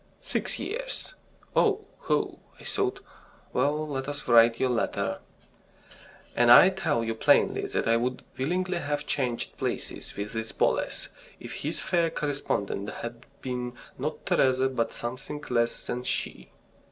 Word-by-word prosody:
"Six - - -1
years." - - -4 0.4
"Oh, 425 -1 +3
ho!" - - 0 0.2
I - - -13
thought. 395 -1 -1 0.5
"Well, 150 +2 +1
let 135 -2 -3
us 145 0 -4
write 115 -1 +6
your 130 - +2
letter..." 120 - 0 1.2
And 120 0 +4
I 120 +10 +10
tell 190 -11 0
you 115 0 -1
plainly 110 - +3
that - - -1
I 115 0 +5
would 125 +2 -2
willingly 180 +6 0
have 145 -2 -2
changed 125 -5 -2
places - - -3
with 100 +1 -4
this 110 0 -4
Boles - - 0 0.3
if - - -8
his - - -3
fair 170 -1 +2
correspondent 135 -10 -2
had 120 0 -7 0.2
been 125 -1 -3 0.2
not 150 +4 -4
Teresa 130 0 +3
but 120 -3 -1
something 130 +5 -5
less 115 -1 +1
than 125 0 -3
she. - - -2
130 Hz, 140 wpm, -28 LUFS, 120-155 Hz, 1.2 s, I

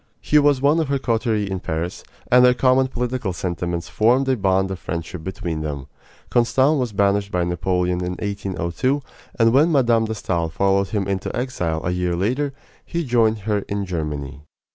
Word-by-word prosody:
He 150 - +3
was 145 -2 +3
one 150 +4 +4
of 160 - 0
her 140 0 +1
coterie 115 -4 0
in 95 -1 -3
Paris, 80 +1 -4 0.3
and 125 0 +7
their 125 0 +6
common 130 +1 +3
political 125 -5 -3
sentiments 85 -1 -3
formed 125 +5 +2
a 130 - +3
bond 95 -2 +1
of 95 - -5
friendship 85 0 -5
between 85 -3 -4
them. 70 -3 -4 0.5
Constant 130 +5 +3
was 125 -3 -1
banished 100 0 +1
by 90 -1 +1
Napoleon 90 +1 0
in 90 0 -2
1802, 100 +6 -2 0.4
and 115 -1 +4
when 150 +6 +5
Mme. 120 -6 +3
de 110 - -3
Stael 85 -5 -1
followed 100 +3 +1
him 100 0 -2
into 95 -1 -2
exile 90 -11 -2
a 85 - 0
year 90 -1 -1
later 130 +11 0 0.3
he 170 0 -3
joined 115 -4 +2
her 105 0 0
in 100 0 -2
Germany. 75 -5 -4
100 Hz, 180 wpm, -21 LUFS, 90-125 Hz, 0.5 s, and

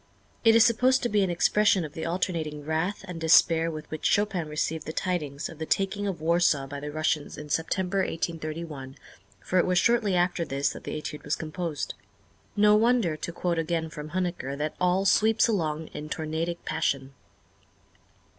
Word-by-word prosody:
It 225 -1 +6
is 230 0 +7
supposed 250 +3 +3
to 240 - +1
be 210 -1 +2
an 190 - +1
expression 185 +1 +3
of 150 - -9
the 160 0 -4
alternating 165 -4 -2
wrath 165 +6 -2
and 175 -2 -7
despair 165 0 +5
with 155 -2 -7
which 155 - -6
Chopin 200 -6 +1
received 155 +1 -2
the 155 - -4
tidings 155 -6 -2
of 165 - -12
the 160 - -3
taking 200 +1 0
of 185 -5 -3
Warsaw 165 -4 +2
by 140 +1 -7
the 150 +1 -6
Russians 155 -1 -1
in 150 0 -8
September, 180 +5 0
1831, 155 -6 -4 0.5
for 185 - +1
it - - +3
was 180 0 +2
shortly 225 -2 +3
after 175 -1 +1
this 140 -2 -1
that - - -9
the - - -3
Étude 150 0 -7
was - - 0
composed. 160 -1 -4 0.6
No 210 0 +5
wonder, 225 -6 +3
to 170 - -5
quote 170 -1 -1
again 165 0 -2
from 150 0 -7
Huneker, 175 -6 -3
that 150 +1 -2
"all 180 +2 +2
sweeps 220 +3 +4
along 160 -7 -1
in 150 +1 -7
tornadic 160 +2 -3
passion." 135 0 -1
165 Hz, 180 wpm, -27 LUFS, 155-190 Hz, 0.6 s, is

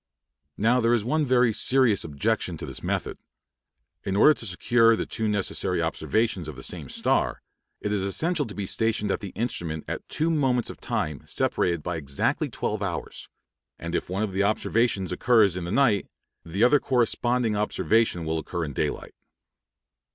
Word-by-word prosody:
Now, 115 +4 +3
there 115 +1 +3
is 110 -3 -2
one 150 +3 +1
very 125 -2 +3
serious 125 -3 +2
objection 70 -3 -1
to - - -6
this - - -6
method. - - -3 0.8
In 95 - -2
order 150 +9 +7
to 115 - -4
secure 115 +5 +3
the - - -3
two 110 -2 -2
necessary 105 -2 -1
observations 110 -7 -1
of 75 - -7
the 65 - -9
same - - -3
star, - - 0 0.4
it 105 - -2
is 105 -2 0
essential 150 - 0
to 105 - -9
be 100 - -3
stationed 105 0 0
at - - -1
the 100 -3 -6
instrument 85 -9 -3
at - - -6
two 160 +2 0
moments 130 -6 +1
of - - -13
time 75 -2 -2
separated 85 -3 0
by 90 -1 -3
exactly 70 -3 -1
twelve - - -3
hours; - - -5 0.5
and 85 0 -6
if - - -2
one 95 +4 -1
of 100 -3 -3
the 95 - 0
observations 105 -1 +1
occurs 105 -1 +3
in 90 -2 -4
the 85 - -4
night, 110 -6 +2 0.4
the 90 +6 -1
other 140 +4 +5
corresponding 120 -2 +1
observation 105 -3 +1
will 80 0 -1
occur 85 +1 -4
in 70 - -6
daylight. - - -3
105 Hz, 175 wpm, -25 LUFS, 90-120 Hz, 0.8 s, order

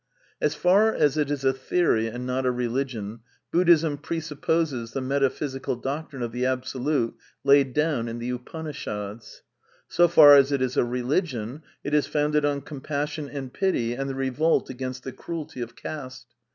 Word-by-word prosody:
As 150 0 +1
far 195 +7 +4
as 150 -7 +2
it 150 -2 0
is 145 -2 -2
a 135 - +4
theory 130 -4 +1
and 120 +2 -5
not 130 +1 -1
a 125 - +2
religion, 120 -3 -3 0.3
Buddhism 165 -4 +4
presupposes 150 -6 -2
the - - -1
metaphysical 135 0 -1
doctrine 135 +1 -4
of 120 - -3
the 125 +2 -3
Absolute 130 0 -1 0.3
laid 140 -2 +5
down 150 -6 +1
in 115 0 -4
the 120 +1 -3
Upanishads. 125 -6 -6 0.4
So 175 0 +4
far 150 -4 +9
as 140 0 +5
it 140 - +1
is 130 -1 -1
a - - +3
religion, 125 - -2 0.2
it 145 - -4
is 150 -1 +3
founded 150 0 +1
on 145 -1 0
compassion 145 +1 -4
and 135 -3 -6
pity 155 - 0
and 135 +2 -3
the 135 - -4
revolt 135 +4 +1
against 130 0 -5
the 130 - -5
cruelty 155 -3 -6
of 120 -1 -6
caste. 130 -5 -7
135 Hz, 165 wpm, -25 LUFS, 125-150 Hz, 0.4 s, far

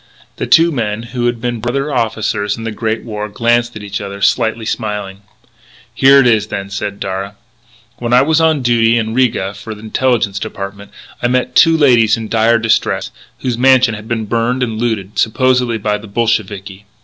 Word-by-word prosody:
The - - -3
two 165 +1 +5
men, 110 -5 -2
who 120 0 -2
had 120 -1 -1
been 120 0 -3
brother 135 +6 -2
officers 110 -3 -1
in 115 - -7
the 115 - -3
Great 110 +1 -3
War, 105 -2 -5
glanced 120 +2 0
at 105 - -8
each 100 0 -4
other, 100 0 -7
slightly 115 +1 +1
smiling. 105 -4 -4 0.7
"Here 135 +1 +6
it 135 - +4
is 110 -3 +3
then," 100 -2 -5
said 100 0 -4
Darragh. 95 +1 -4 0.6
"When 120 -1 -3
I 125 +1 +5
was 160 +2 +2
on 160 -4 +2
duty 120 -1 +3
in 110 -1 -2
Riga 115 -6 0
for 110 +2 -8
the 105 - -13
Intelligence 110 -3 0
Department, 100 -1 -7 0.3
I 120 - +2
met 125 0 0
two 165 -1 +5
ladies 120 -8 +4
in 110 -1 -6
dire 115 +1 +3
distress, 110 0 0 0.3
whose 125 -2 -2
mansion 130 -2 +4
had 105 0 -8
been 115 -2 -2
burned 120 +4 0
and 110 -3 -3
looted, 110 -4 -2
supposedly 125 0 +1
by 105 0 -1
the 110 - -11
Bolsheviki. 105 -3 -2
115 Hz, 185 wpm, -15 LUFS, 105-120 Hz, 0.7 s, Here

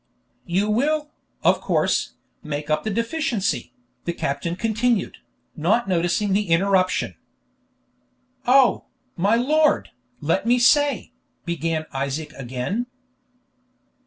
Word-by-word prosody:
"You 190 +4 +1
will, 295 +7 0 0.3
of - - +3
course, - - 0 0.3
make 150 0 -4
up 155 - +1
the 220 - -2
deficiency," 230 -1 -1 0.3
the 170 - -1
captain 140 +3 -2
continued, 225 +1 0 0.4
not 195 +9 +1
noticing 180 +3 +1
the 205 -2 0
interruption. 185 +2 +2 1.3
"Oh, 260 -1 +5 0.3
my 200 +5 +2
lord, 300 +6 +2 0.3
let - - 0
me 245 +1 +4
say 290 +4 +3
" - - -46
began 165 -2 -1
Isaac 140 +3 -3
again. 135 - -3
200 Hz, 105 wpm, -23 LUFS, 165-240 Hz, 1.3 s, Oh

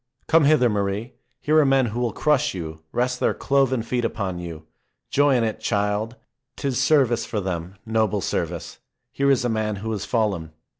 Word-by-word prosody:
Come 160 -1 +4
hither, 145 -4 +5
Marie! 105 +2 -2 0.3
Here 155 +1 +3
are - - +6
men 135 -1 +4
who 115 +1 -3
will 120 -2 0
crush 150 -6 +1
you, 80 -3 -6
rest 125 +1 0
their - - +1
cloven 135 -3 +1
feet 120 +1 -2
upon 100 -6 -2
you. 80 -3 -8 0.5
Joy 145 -1 +4
in 120 - +2
it, 110 -1 -2
child! 105 +2 -1 0.4
'Tis 135 -2 -1
service 135 -5 +3
for 110 - -3
them, 90 -1 -4
noble 110 -2 +1
service. - - -3 0.3
Here 140 0 +1
is 130 -3 +3
a - - +3
man 110 -2 -1
who 110 +3 -5
has 105 -2 -3
fallen. 100 -10 -1
115 Hz, 185 wpm, -23 LUFS, 100-130 Hz, 0.5 s, are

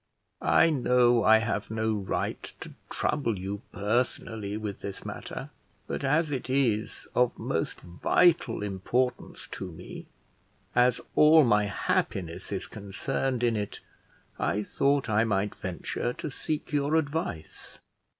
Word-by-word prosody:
"I 165 - +5
know 125 -4 +4
I 110 +1 +7
have 110 -2 -2
no 110 0 0
right 100 -3 -2 0.2
to - - -8 0.2
trouble 125 -8 0
you 100 +2 -4
personally 105 -1 -1
with 105 -2 -5
this 100 - -7
matter, - - -6 0.3
but - - -4
as 150 +3 +2
it 130 -2 -3
is 120 -5 0
of 125 -1 +2
most - - -2
vital 115 - +2
importance 120 +6 -2
to 95 -2 -5
me, 80 - -10 0.7
as 125 0 +3
all 155 +1 +8
my 105 -4 +4
happiness 95 -3 -2
is 95 - -2
concerned 120 +5 -3
in 120 -2 +3
it, 105 -1 -3 0.6
I 105 +2 0
thought 140 +6 +1
I 110 0 +3
might 100 -2 0
venture 95 +6 -3
to - - -5
seek 150 +4 -4
your 145 +1 +2
advice." 145 - -3
115 Hz, 130 wpm, -28 LUFS, 100-135 Hz, 0.7 s, all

